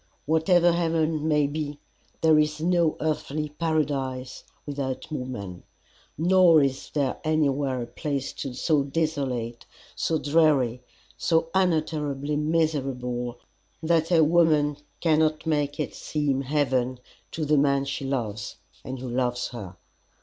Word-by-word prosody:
Whatever 170 +3 +4
heaven 160 -2 0
may 150 -2 +3
be, 145 0 -4 0.4
there 160 -1 +5
is 150 0 +1
no 170 -1 +2
earthly 150 -1 -2
paradise 140 -5 -2 0.2
without 140 -1 -4
woman, 125 -11 -5 0.6
nor 175 0 +6
is 135 -1 -2
there 140 -4 -1
anywhere 140 -5 +1
a - - -5
place 135 +3 -4 0.3
so 155 -4 +2
desolate, 135 -6 -2 0.3
so 160 - 0
dreary, 145 -6 +2 0.4
so 165 0 +1
unutterably 150 -5 0
miserable 135 -6 -1 0.5
that 165 +1 +2
a 165 -2 +6
woman 155 -3 +3 0.2
cannot 155 -1 +2
make 145 -2 0
it 150 - -2
seem 145 -3 -1
heaven 130 -3 0 0.3
to 160 - -3
the 150 0 +3
man 140 -1 +2
she 140 0 -4
loves 110 -6 -3 0.3
and 130 0 -5
who 130 +1 -6
loves 125 0 -1
her. 100 -7 -8
145 Hz, 120 wpm, -26 LUFS, 130-160 Hz, 0.6 s, nor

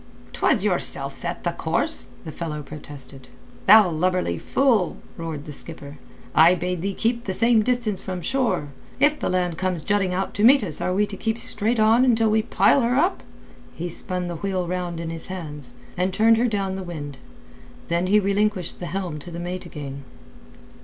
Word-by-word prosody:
"'Twas - - +2
yourself - - -1
set - - -2
the - - 0
course," 80 0 -1 0.2
the 160 - -5
fellow 150 -1 -5
protested. 140 -3 -10 0.4
"Thou 210 0 +9
lubberly 170 - 0
fool," 240 -10 +1 0.2
roared 160 -3 -6
the 150 - -7
skipper. 145 -1 -8 0.3
"I 165 +3 +6
bade 180 -1 -3
thee 195 +1 -2
keep 235 +1 0
the 190 - -2
same 230 0 +4
distance 220 -4 0
from 185 -2 -4
shore. 210 - 0 0.3
If 295 +2 +3
the - - -1
land 180 -3 -1
comes 185 -4 -1
jutting 205 -3 +1
out 190 +1 -2
to 205 - -1
meet 260 +1 +7
us, 160 -7 -3
are - - 0
we 200 +3 +2
to 205 - -7
keep 220 +3 -2
straight 225 +1 -1
on 220 +3 +5
until 225 -4 +3
we 220 0 +3
pile 270 +4 +3
her 240 +1 +1
up?" 345 +8 +2 0.5
He 175 +2 -4
spun 180 +1 -2
the 175 -1 -4
wheel 185 0 -2
round 175 -1 -3
in 165 -1 -4
his 165 -1 -5
hands, 150 -8 -7 0.2
and 185 +1 0
turned 220 +3 +4
her 240 +2 +2
down 200 -4 -1
the - - -5
wind. 145 -6 -7 0.7
Then 170 +2 0
he 210 +3 +5
relinquished 200 -2 0
the 175 - -5
helm 180 -5 -4
to 160 - -9
the 170 - -7
mate 180 +1 -5
again. 140 -3 -7
185 Hz, 190 wpm, -23 LUFS, 165-215 Hz, 0.7 s, Thou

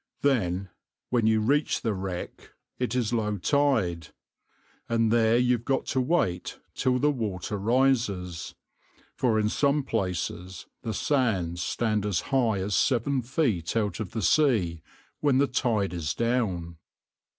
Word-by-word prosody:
Then, 95 -9 +1 0.4
when 120 -3 +2
you 110 -1 +3
reach 145 +7 +1
the 115 - 0
wreck, 95 -2 -6 0.3
it 125 -1 -1
is 120 -2 0
low 105 -3 0
tide, 105 - +1 0.8
and 115 -1 +2
there 115 0 +4
you've 125 -1 +2
got 135 +1 0
to 130 - +2
wait 125 - 0 0.2
till 130 -1 +1
the 150 +4 +3
water 105 - -3
rises, 105 -7 0 0.6
for 115 -4 +1
in 105 - +2
some 140 +5 +1
places 90 - -3 0.2
the 110 -2 -4
sands 95 - 0
stand 105 +1 0
as 95 -5 0
high 120 -6 +3
as 100 +2 -1
seven 130 +1 +2
feet 115 - -1
out 105 -2 -1
of 105 -4 -4
the 110 -2 -2
sea 95 - +2 0.4
when 140 -3 +3
the 140 - +4
tide 115 -7 0
is 80 -4 -2
down. 100 -9 -1
110 Hz, 140 wpm, -27 LUFS, 95-125 Hz, 0.8 s, there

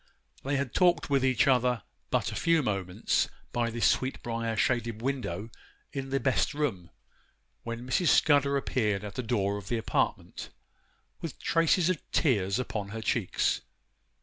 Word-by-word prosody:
They 140 +1 -1
had 135 -2 -2
talked 175 -4 +3
with 135 -2 +3
each 130 -1 +3
other 125 -3 +2 0.3
but - - 0
a - - -6
few 165 -2 +2
moments, 95 -5 0 0.2
by 120 -1 0
the 115 0 -5
sweetbriar 115 -3 0
shaded 115 -1 0
window 115 -6 -3 0.4
in 135 -1 -4
the 135 +1 +1
best 130 +3 +1
room, 105 - -2 0.7
when 115 +1 -6
Mrs. 175 +7 +1
Scudder 140 -2 +4
appeared 105 -7 0
at 105 - -6
the 125 - -3
door 100 -4 0
of 100 - -12
the 120 - 0
apartment, 110 - -2 0.7
with 165 - -5
traces 165 +1 +2
of 175 - -3
tears 100 - +2
upon 110 -5 -3
her 110 +2 -5
cheeks. 110 -2 0
120 Hz, 150 wpm, -29 LUFS, 110-140 Hz, 0.7 s, Scudder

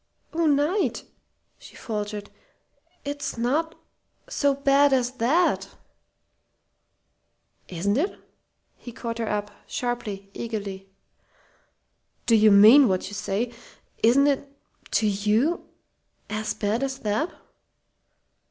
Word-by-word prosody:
"Oh, 330 0 +1
Knight!" 300 +7 +1 0.6
she - - -15
faltered. 210 -2 -5 0.7
"It's 285 -3 -4
not 295 +8 0 0.5
so 285 -1 +1
bad 280 0 +4
as 250 -2 +1
that!" 295 +10 +2 2.0
"Isn't 190 +4 -1
it?" 345 +8 -1 0.6
he 240 - -10
caught 230 0 -5
her 225 - -2
up 205 0 -2 0.2
sharply, 210 -5 -4
eagerly. 200 -4 -5 1.4
"Do 230 - +4
you 215 0 +6
mean 220 +7 +8
what 185 -2 -1
you - - -11
say? 205 +4 -2 0.5
Isn't 255 +5 +5
it, 280 -1 0 0.4
to 220 - +1
you 215 - +1 0.6
as 215 0 -2
bad 215 +3 -1
as 270 -1 -2
that?" 215 - 0
230 Hz, 105 wpm, -25 LUFS, 210-280 Hz, 2.0 s, mean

